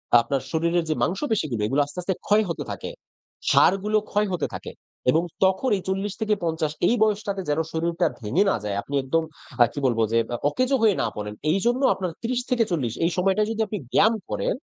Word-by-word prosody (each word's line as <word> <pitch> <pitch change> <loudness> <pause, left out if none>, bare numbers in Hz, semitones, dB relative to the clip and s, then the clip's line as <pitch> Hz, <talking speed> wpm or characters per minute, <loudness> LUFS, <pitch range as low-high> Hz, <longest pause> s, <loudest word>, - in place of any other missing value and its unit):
আ - - +11
আপনার 135 +2 -1
শরীরের 170 +1 +1
যে 155 - +1
মাংসপেশিগুলো 180 - -1
এগুলো 135 +5 +2
আস্তে, 145 +4 -13
আস্তে 190 +2 -1
ক্ষয় 210 +1 +4
হতে 170 - -3
থাকে। - - -5 0.6
সারগুলো 200 +3 +4
ক্ষয় 210 +1 +2
হতে 170 -5 -1
থাকে। - - -6 0.4
এবং 160 +4 +2 0.2
তখন 190 +7 +1
এই 190 - -7
৪০ 195 +1 -1
থেকে 215 -1 +2
৫০ 160 -2 -1 0.2
এই 240 - +3
বয়সটাতে 205 -2 0
যেন 145 - +1
শরীরটা 165 +1 0 0.2
ভেঙে 120 - +2
না - - +2
যায়, 100 -1 -2
আপনি 145 - -10
একদম 165 +5 +1 0.4
আ - - +6
কি - - -4
বলবো? 115 -3 +2
যে 115 - +2 0.2
আ - - -1
অকেজো 255 - +1
হয়ে 215 -4 +4
না - - +1
পড়েন। 105 0 -5 0.2
এইজন্য 240 - +1
আপনার 185 -2 -3
৩০-৪০ 230 - 0
এই 170 - +2
সময়টায় 195 +3 +2
যদি 225 0 -2
আপনি 210 - -3
ব্যায়াম 215 +3 +5 0.2
করেন - - -1
185 Hz, 195 wpm, -24 LUFS, 155-210 Hz, 0.6 s, আ